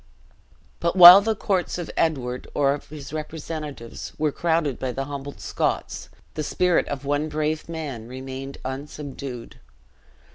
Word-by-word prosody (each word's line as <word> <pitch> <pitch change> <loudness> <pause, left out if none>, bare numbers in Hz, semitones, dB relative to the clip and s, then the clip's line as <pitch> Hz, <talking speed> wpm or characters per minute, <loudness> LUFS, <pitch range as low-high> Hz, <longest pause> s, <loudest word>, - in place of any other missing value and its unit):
But 170 +1 0
while 180 +1 +12
the 220 +1 0
courts 190 -4 -1
of 175 -2 -5
Edward, 130 -6 -1
or 140 -1 +3
of 145 - -8
his 150 -1 -9
representatives, 155 -5 -6
were 150 -1 +1
crowded 160 -4 0
by 130 -1 -3
the 135 +2 -3
humbled 140 0 -7
Scots, - - -2 0.2
the 155 - -3
spirit 180 +4 +1
of 140 0 -5
one 145 +2 0
brave 155 +1 -2
man 145 -9 -5
remained 130 +2 -7
unsubdued. 135 -2 -7
145 Hz, 140 wpm, -24 LUFS, 135-160 Hz, 0.2 s, while